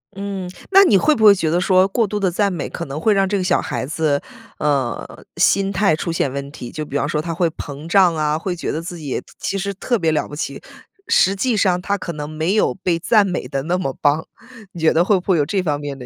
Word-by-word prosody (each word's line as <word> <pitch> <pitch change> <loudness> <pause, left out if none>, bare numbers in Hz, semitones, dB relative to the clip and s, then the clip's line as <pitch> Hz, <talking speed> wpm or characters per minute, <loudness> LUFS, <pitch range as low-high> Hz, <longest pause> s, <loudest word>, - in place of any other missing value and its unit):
嗯， 195 -2 -5 0.2
那 390 +1 +8
你 205 - +5
会 305 +10 +3
不 220 - -1
会 205 -1 +8
觉 165 -4 -1
得 170 - +1
说 185 +1 +4
过 225 +2 +1
度 210 +1 -3
地 190 -3 +1
赞 200 +2 +1
美 170 -5 -4
可 - - -5
能 140 +2 -5
会 215 +5 +3
让 195 -1 +2
这 200 +1 0
个 185 - -1
小 180 -1 +2
孩 - - -3
子， 150 0 0 0.4
呃， 140 -5 -2
心 195 0 +2
态 195 -4 +2
出 165 +1 -3
现 145 -5 -1
问 140 0 -5
题， 125 -5 -8
就 155 - -5
比 140 - -8
方 145 - 0
说 150 0 -1
他 165 +1 -4
会 170 0 +1
膨 145 0 -8
胀 180 -2 +4
啊， 155 0 0
会 180 +1 -3
觉 170 - -3
得 160 - -3
自 175 +1 -7
己 145 -5 -4 0.2
其 195 - -3
实 200 +1 -3
特 235 +4 -1
别 160 -1 +1
了 155 - -1
不 145 - -9
起。 140 -3 -5 0.5
实 455 - +4
际 235 +3 0
上 180 -3 +2
他 200 +2 -1
可 180 -3 -5
能 150 -1 -6
没 160 +6 -1
有 215 - +2
被 180 -3 -1
赞 210 +3 +3
美 180 -2 -3
得 135 -2 -3
那 175 +4 0
么 135 -8 -2
棒。 150 +2 +2 0.5
你 170 - -8
觉 160 - +4
得 170 +2 +3
会 200 -1 +3
不 - - -10
会 175 - +3
有 145 - +2
这 190 +5 -1
方 150 -4 -1
面 145 -2 -6
的 125 - -9
175 Hz, 290 characters per minute, -20 LUFS, 150-195 Hz, 0.5 s, 那